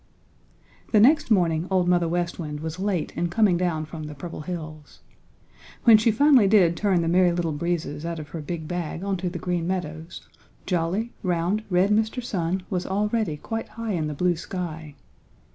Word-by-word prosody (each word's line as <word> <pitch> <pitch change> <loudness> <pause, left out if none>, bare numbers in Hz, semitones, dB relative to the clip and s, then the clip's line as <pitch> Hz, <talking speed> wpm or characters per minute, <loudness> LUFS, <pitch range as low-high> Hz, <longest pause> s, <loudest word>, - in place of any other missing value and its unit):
The 215 - +6
next 285 +8 +5
morning 175 -5 +2
Old 185 -2 +2
Mother 175 -1 +3
West 175 +1 -2
Wind 150 -2 -5
was 160 +2 -5
late 190 -4 -1
in 175 - 0
coming 205 -1 +3
down 170 -3 -1
from 155 0 -8
the 150 0 -8
Purple 165 +3 -7
Hills. 155 -2 -8 0.8
When 225 -3 +8
she 220 - +3
finally 255 -1 +5
did 190 -5 +4
turn 190 -3 +1
the - - -1
Merry 180 +1 +4
Little 170 -2 -1
Breezes 155 -1 -3
out 170 0 -3
of 150 -2 -8
her 160 +1 -6
big 160 +1 -5
bag 175 0 -4
onto 190 -2 -1
the 175 - -6
Green 175 -1 -2
Meadows 165 -2 -5 0.4
jolly, 185 +6 -1
round, 180 +3 0
red 185 +2 +3
Mr. 220 +3 +1
Sun 185 -4 -2
was 180 -3 -3
already 210 -3 0
quite 225 +8 -5
high 225 0 -4
in 160 -4 -1
the 150 - -4
blue 180 +3 +1
sky. 160 -4 -6
175 Hz, 180 wpm, -25 LUFS, 165-200 Hz, 0.8 s, When